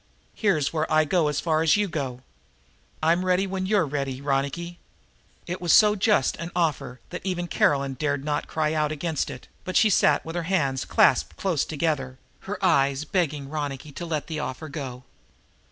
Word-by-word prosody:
Here's 170 - +1
where 160 0 -1
I 155 0 +4
go 160 0 +2
as 150 -1 0
far 160 -2 +1
as 160 +4 +4
you 205 -1 +1
go. 135 -7 -4 0.8
I'm 170 +3 +3
ready 185 +1 +2
when 190 -1 -3
you're 200 -4 +3
ready, 135 -2 -3
Ronicky." 140 +5 -2 0.7
It 180 +1 -5
was 175 -2 +1
so 210 +3 +6
just 205 - +2
an 165 +1 -5
offer 150 -7 -1
that 180 - -5
even 180 -2 -2
Caroline 140 -4 +1
dared 145 0 -2
not 150 -1 -1
cry 155 -1 0
out 155 -1 0
against 155 0 -2
it, - - -9 0.2
but 185 - -1
she 215 - +5
sat 150 -5 +3
with 165 +1 -6
her 175 - 0
hands 140 -9 0
clasped - - +3
close 175 -7 0
together, 145 -5 -2 0.3
her 205 - -2
eyes 140 -4 +2
begging 150 -5 -1
Ronicky 145 -1 -4
to 170 - -6
let 155 -3 -2
the 155 -2 -4
offer 150 +2 -5
go. 130 -3 -6
155 Hz, 185 wpm, -25 LUFS, 140-175 Hz, 0.8 s, so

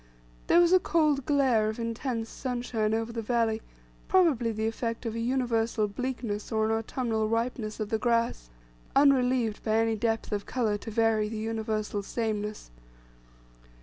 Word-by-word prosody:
There 340 - +6
was 350 +1 +5
a 370 - +7
cold 305 -6 +1
glare 260 -7 +3
of 220 - -4
intense 230 0 -3
sunshine 240 -4 -2
over 225 +1 -2
the 230 - -3
valley, 225 -1 0 0.5
probably 310 -12 +3
the 220 0 -2
effect 230 +1 -3
of 225 - -2
an 230 0 -3
universal 230 -3 +1
bleakness 230 -1 -4
or 220 -1 +1
an 220 - 0
autumnal 225 -1 -1
ripeness 230 -1 -2
of 215 -1 -3
the 220 -1 0
grass, 230 - 0 0.5
unrelieved 255 -5 +3
by 215 -1 +1
any 225 0 +2
depth 225 +1 -1
of 205 -1 -2
colour 220 -5 0
to 225 - -7
vary 220 -1 +2
the 220 - -5
universal 215 -1 -2
sameness. 210 - -3
225 Hz, 155 wpm, -28 LUFS, 220-245 Hz, 0.5 s, a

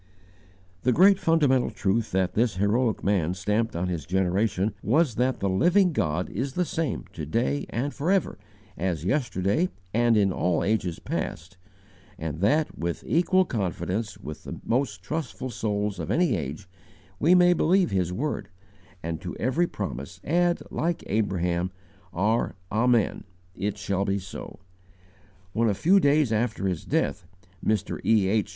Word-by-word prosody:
The 125 - +2
great 190 +7 +6
fundamental 145 -6 +3
truth 110 +3 0
that 95 -1 +1
this 115 -2 +1
heroic 105 +4 +1
man 90 -4 +1
stamped 105 +4 0
on 90 +2 -1
his 85 -6 -4
generation 95 +2 +1
was 135 - +2
that 125 +2 0
the 100 - +1
Living 175 - +3
God 85 - 0
is 130 +5 -3
the 180 +3 0
same 160 -3 -2
to - - -6
day 70 +1 -1
and 135 +5 -2
forever 180 +6 0 0.4
as 85 -3 -2
yesterday 110 - +1 0.2
and 120 0 +3
in 100 -2 +3
all 90 -2 +1
ages 95 -5 0
past, 90 +4 -4 0.6
and 80 -1 -4
that, 150 - +2
with 85 +1 -3
equal 185 +3 +3
confidence 105 - -2
with 75 0 -8
the - - -7
most 115 -6 -1
trustful 130 - -4
souls 105 -3 -2
of 80 - -4
any 170 -8 +2
age, 80 +4 -5 0.5
we 170 +4 +5
may 180 0 +6
believe 180 +2 +3
His 90 -2 0
word, 140 +11 -3 0.5
and 80 0 -4
to 90 -2 -6
every 155 +9 +1
promise 70 - -6
add, 175 +2 +1
like 170 +2 -1
Abraham, 90 -4 0 0.4
our 105 +6 0 0.2
'Amen' 115 0 +2 0.3
IT 100 +2 -3
SHALL 100 0 -1
BE 100 0 0
SO!* 95 0 -8 1.0
When, 115 0 +2
a 100 - +1
few 185 - +4
days 145 - +3
after 110 -2 0
his 90 -3 -2
death, 85 +4 -1 0.4
Mr. 110 -1 -1
E. 110 -4 +3
H. 105 0 +1
105 Hz, 150 wpm, -26 LUFS, 95-140 Hz, 1.0 s, great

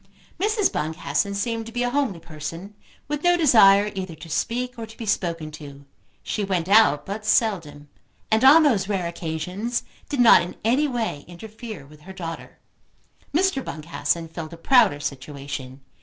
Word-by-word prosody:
Mrs. 420 +1 +1
Boncassen 155 +4 -1
seemed 225 +2 -2
to - - -8
be 245 +1 -1
a 245 - -1
homely 255 -10 0
person, 165 +5 -8 0.3
with 295 0 -3
no 350 0 +4
desire 210 - +6
either 185 -3 -5
to 165 +2 -12
speak, 245 +9 -2
or 225 - -6
to 225 - -15
be 230 - -6
spoken 170 -6 -2
to. 140 -2 -11 0.4
She 210 - -2
went 185 -4 -1
out 200 -8 +5
but 205 +2 -5
seldom, 180 -10 0 0.4
and 220 +2 +3
on 300 +5 +8
those 210 -9 +2
rare 190 -4 -1
occasions 175 +7 -3 0.3
did 285 - -3
not 235 -7 +8
in 175 - -6
any 260 +7 +2
way 230 - -3
interfere 215 - -9
with 150 +1 -17
her 190 +5 -11
daughter. 165 -3 -7 0.7
Mr. 340 -3 +1
Boncassen 165 +1 -3
filled 160 0 -8
a - - -9
prouder 210 - +4
situation. 140 -1 -6
195 Hz, 165 wpm, -23 LUFS, 160-235 Hz, 0.7 s, on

